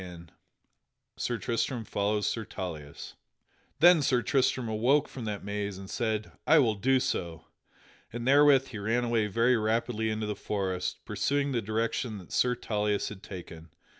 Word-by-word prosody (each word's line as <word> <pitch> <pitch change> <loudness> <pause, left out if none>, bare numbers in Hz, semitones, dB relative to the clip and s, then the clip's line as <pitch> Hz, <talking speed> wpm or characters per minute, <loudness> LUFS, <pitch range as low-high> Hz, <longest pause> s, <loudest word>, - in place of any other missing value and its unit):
[Sidenote: 85 -2 -10 0.9
Sir 120 - -2
Tristram 115 +2 -2
follows 105 +1 0
Sir 115 - -1
Tauleas] 80 -7 -7 0.7
Then 175 -1 +7
Sir 125 -3 +2
Tristram 130 -3 +1
awoke 120 +7 +2
from 125 -4 -8
that 105 -2 -4
maze 100 -1 -3
and 95 0 -9
said, 110 -3 -2 0.2
"I 160 - +7
will 120 -7 +4
do 130 +6 +2
so." 85 -8 -3 0.7
And 120 +1 -5
therewith 140 -1 +5
he 110 - -7
ran 115 +4 0
away 115 -3 +1
very 115 +4 +3
rapidly 110 +1 0
into 110 0 -2
the 105 0 -3
forest, 95 -3 -3
pursuing 140 0 0
the 120 -3 0
direction 110 +1 -2
that 90 -4 -13
Sir 125 0 +2
Tauleas 105 -3 -1
had 100 -3 -10
taken. 85 -4 -10
110 Hz, 160 wpm, -29 LUFS, 100-125 Hz, 0.9 s, Then